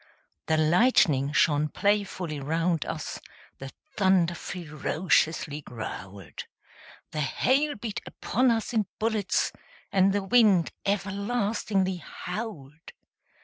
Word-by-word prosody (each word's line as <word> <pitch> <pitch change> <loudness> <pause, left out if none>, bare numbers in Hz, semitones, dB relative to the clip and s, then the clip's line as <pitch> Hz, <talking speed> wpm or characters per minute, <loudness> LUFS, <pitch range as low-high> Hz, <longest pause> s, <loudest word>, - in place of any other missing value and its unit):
The 160 - +2
lightning 155 - +4
shone 150 0 +3
playfully 195 -5 -1
round 165 +3 0
us; - - -5 0.4
The 135 - -7 0.3
thunder 190 -3 +3
ferociously 160 -1 -1
growled; 100 - -8 0.7
The 155 -1 -2
hail 275 - +1
beat 220 -1 -5
upon 255 +4 0
us 230 +1 0
in 215 -3 +1
bullets; 215 -3 0 0.4
And 195 0 +4
the 200 0 0
wind 200 -5 +4 0.2
everlastingly 200 -1 0
howled. 170 - -7
185 Hz, 100 wpm, -27 LUFS, 155-210 Hz, 0.7 s, lightning